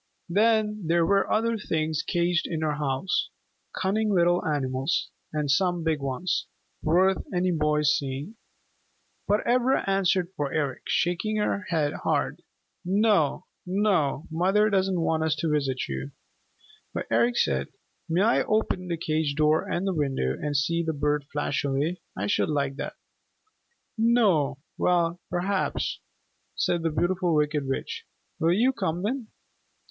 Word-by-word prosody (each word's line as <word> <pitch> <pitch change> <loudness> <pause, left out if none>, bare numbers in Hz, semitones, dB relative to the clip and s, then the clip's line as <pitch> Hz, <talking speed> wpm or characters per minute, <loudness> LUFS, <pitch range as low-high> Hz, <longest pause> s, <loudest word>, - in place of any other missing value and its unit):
Then 210 0 +2
there 170 0 +3
were 195 +2 +2
other 230 +1 +1
things 155 -5 -1
caged 175 -1 0
in 160 -2 -3
her 155 -1 0
house, 150 +5 -1 0.5
cunning 215 +3 +1
little 175 -1 +3
animals, 135 -3 -1 0.2
and 150 -2 0
some 175 +2 +1
big 160 -2 +1
ones, 140 +6 -2 0.3
worth 185 +4 +3
any 180 0 +1
boy's 150 -2 +2
seeing. 140 +9 -4 0.9
But 205 +1 +1
Ivra 250 +2 +2
answered 190 -2 +2
for 145 -2 -2
Eric, 145 -5 -1
shaking 180 +5 0
her 210 -1 0
head 155 -4 +1
hard. - - 0 0.4
"No, 195 -4 +2 0.2
no. 180 -7 +1
Mother 195 +6 +2
doesn't 190 -2 +1
want 160 -1 +1
us 160 -1 +1
to 160 0 -1
visit 135 -3 0
you." 65 +1 -4 0.9
But - - -2
Eric 120 +1 +3
said, 65 0 +1 0.4
"May 175 +4 +2
I 230 +3 +3
open 215 -4 0
the 170 -1 -2
cage 155 -2 -1
door 155 +1 +2
and 180 - -1
the 195 - 0
window 135 - 0
and 145 - -2
see 170 +4 +1
the 160 -1 -1
bird 145 0 0
flash 145 -1 -1
away? 145 +6 -1 0.2
I 100 - -1
should 105 - +1
like 140 -2 0
that." - - -5 1.0
"No. 200 - +3 0.2
Well, 175 -1 +2
perhaps," 185 +2 -1 0.6
said 175 - 0
the 165 - +1
Beautiful 175 +1 +1
Wicked 150 -2 +1
Witch. 455 - -4 0.3
"Will 165 0 +3
you 245 +7 +3
come 170 -5 -2
then?" 240 +2 -2
165 Hz, 145 wpm, -26 LUFS, 150-195 Hz, 1.0 s, there